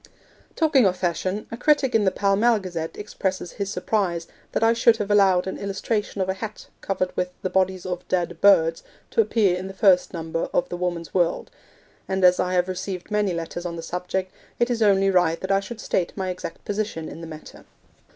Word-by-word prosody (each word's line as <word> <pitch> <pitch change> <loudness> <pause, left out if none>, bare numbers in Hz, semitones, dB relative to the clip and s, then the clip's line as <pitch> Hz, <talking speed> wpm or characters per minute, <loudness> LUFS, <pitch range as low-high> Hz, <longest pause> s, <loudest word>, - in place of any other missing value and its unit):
Talking 290 - +4
of 185 -1 0
Fashion, 185 +3 -2
a 230 - -5
critic 280 0 +2
in 220 -2 +3
the - - +5
Pall 195 +1 +1
Mall 230 +3 +4
Gazette 175 -5 -5
expresses 190 -3 -3
his 200 -1 -4
surprise 185 -5 -1 0.3
that - - 0
I 225 0 +5
should 230 -1 +4
have 210 -1 -2
allowed 190 -3 +4
an 190 - -5
illustration 200 +1 -2
of 185 - 0
a 190 - 0
hat, 215 +2 -7 0.2
covered 185 -2 -2
with 180 0 -1
'the 185 - -2
bodies 190 -1 +1
of 180 -1 -4
dead 175 -2 -1
birds,' 165 -5 +5 0.3
to 460 - +4
appear 210 - +2
in 185 +1 -5
the 195 - -9
first 190 -3 +4
number 165 -1 -3
of - - +1
the - - -4
Woman's 175 -2 -3
World; 175 -2 0 0.6
and 190 0 -1
as 180 0 +5
I 180 0 0
have 180 0 +2
received 185 +1 -5
many 210 -2 +1
letters 170 0 -4
on 175 -1 -4
the 165 - -6
subject, 180 +2 -3 0.2
it 240 +1 +1
is 230 -1 -1
only 195 -2 +4
right 175 -3 +2
that 190 - -3
I 195 - +4
should 220 +3 -8
state 180 -4 -1
my 190 -1 -2
exact 180 -2 -8
position 205 -6 -3
in 165 - -9
the 165 - -7
matter. 155 -1 -11
190 Hz, 210 wpm, -24 LUFS, 180-205 Hz, 0.6 s, the